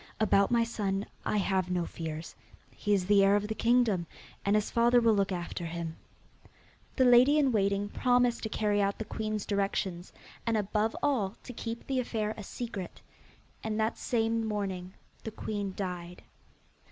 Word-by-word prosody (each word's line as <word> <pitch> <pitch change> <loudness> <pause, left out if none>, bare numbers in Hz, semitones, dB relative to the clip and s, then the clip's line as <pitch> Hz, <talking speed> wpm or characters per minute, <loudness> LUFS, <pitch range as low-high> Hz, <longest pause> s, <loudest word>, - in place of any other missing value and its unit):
About 200 -2 +4
my 235 -1 +3
son, 205 -3 -2 0.2
I - - +1
have 190 -2 +1
no 180 -1 0
fears. 160 -1 -6 0.4
He 205 - -3
is 195 -3 +3
the 200 0 +5
heir 195 +1 +5
of 205 0 0
the 220 - -2
kingdom, 225 -6 +2 0.4
and 200 +1 +2
his 210 0 0
father 240 +1 +4
will 230 -2 +4
look 200 -1 +1
after 175 -1 -4
him.' 165 -1 -5 1.0
The 260 - +4
lady 250 +4 +6
in 280 -3 +3
waiting 200 -2 +1
promised 245 +2 +2
to 220 - -3
carry 210 -1 +1
out 200 0 0
the 220 - -4
queen's 215 -1 -3
directions, 195 -3 -1 0.3
and 230 -1 +1
above 210 +2 0
all 225 -8 +1
to 250 - -8
keep 230 0 -5
the 265 -1 0
affair 220 -3 -2
a - - -8
secret. 205 -3 -6 0.6
And 220 0 -2
that 220 +1 +1
same 225 -1 0
morning 195 -4 -3 0.3
the - - -4
queen 205 -2 -4
died. 180 -2 -5
210 Hz, 170 wpm, -30 LUFS, 195-230 Hz, 1.0 s, lady